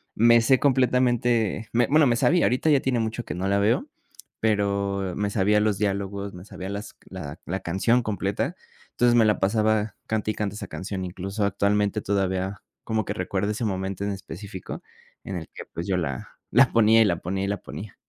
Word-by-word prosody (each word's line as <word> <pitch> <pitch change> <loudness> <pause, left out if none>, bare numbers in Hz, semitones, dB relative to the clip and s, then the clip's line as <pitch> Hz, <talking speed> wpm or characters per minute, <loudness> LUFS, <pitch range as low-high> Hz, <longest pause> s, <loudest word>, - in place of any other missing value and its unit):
me 115 +1 +6
sé 130 +3 +4
completamente 120 -5 +2
me 120 0 +4
bueno 150 0 +5
me 120 - +3
sabía, 170 +8 +3
ahorita 130 +6 +1
ya 145 -3 +5
tiene 130 -3 0
mucho 115 +2 -2
que - - -5
no 95 +2 -2
la 100 0 +2
veo, 105 +3 +2 0.5
pero 100 -3 0
me 105 0 -1
sabía 105 +1 +2
los 105 -2 +1
diálogos, 100 -1 -2
me 90 +1 -10
sabía 95 -2 -7
las 100 +1 -6
la 80 -5 -7
la 95 +3 -2
canción 95 +8 +1
completa. 100 -2 -2 0.4
Entonces, 120 -1 +3
me 115 - +5
la 105 - +2
pasaba 110 +1 +1
cante 110 -1 0
y - - -7
cante 105 -1 -3
esa - - -6
canción, 95 -1 -5
incluso, 95 +3 -4
actualmente, 100 +1 +1
todavía 95 0 -1 0.2
como 110 -1 0
que - - -3
recuerdo 95 +3 -2
ese 110 +2 -2
momento 95 0 -2
en 100 - -1
específico, 95 0 -7 0.4
en 95 - -5
el 80 -2 -6
que, - - -8
pues, 85 +1 -4
yo 95 -2 0
la 70 -7 -3 0.2
la 125 +4 +5
ponía, 115 0 +5
y - - +6
la 90 -5 +1
ponía, 95 +3 -3
y - - -1
la 100 0 -1
ponía. 100 +3 -9
100 Hz, 200 wpm, -25 LUFS, 95-115 Hz, 0.5 s, me